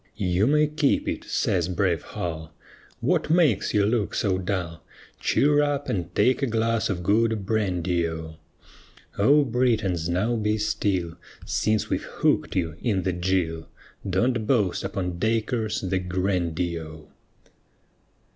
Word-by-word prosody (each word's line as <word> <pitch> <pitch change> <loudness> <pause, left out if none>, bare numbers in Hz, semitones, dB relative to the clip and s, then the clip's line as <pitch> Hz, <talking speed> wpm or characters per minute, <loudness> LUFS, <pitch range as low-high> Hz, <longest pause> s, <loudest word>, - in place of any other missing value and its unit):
"You 95 +1 +1
may 150 +2 +4
keep 150 -1 +1
it," - - -3
says 85 -2 0
brave 90 -3 0
Hull. 80 -2 -6 0.5
"What - - +1
makes 155 - +3
you 105 -2 +3
look 110 -1 0
so 95 -3 +1
dull? 90 -4 -3 0.4
Cheer 145 +1 +3
up 145 -1 -1
and 90 -3 -2
take 130 +2 +3
a 135 - +1
glass 115 0 0
of 90 -3 -2
good 110 +1 +1
brandy 90 -5 0
O;" 80 -1 -7 0.8
O 145 +8 +5
Britons 110 -9 0
now 100 +7 +1
be 105 -1 0
still, 100 -5 -1 0.3
Since 110 -1 0
we've - - 0
hooked - - 0
you 85 -3 -1
in 100 -7 0
the 95 - 0
gill, 85 -2 -1 0.4
Don't 115 +4 +1
boast 105 -9 +1
upon 90 -3 -3
Dacres 110 0 0
the 95 0 -1
grandee 90 -2 -1
O. 80 -1 -11
100 Hz, 135 wpm, -25 LUFS, 90-115 Hz, 0.8 s, O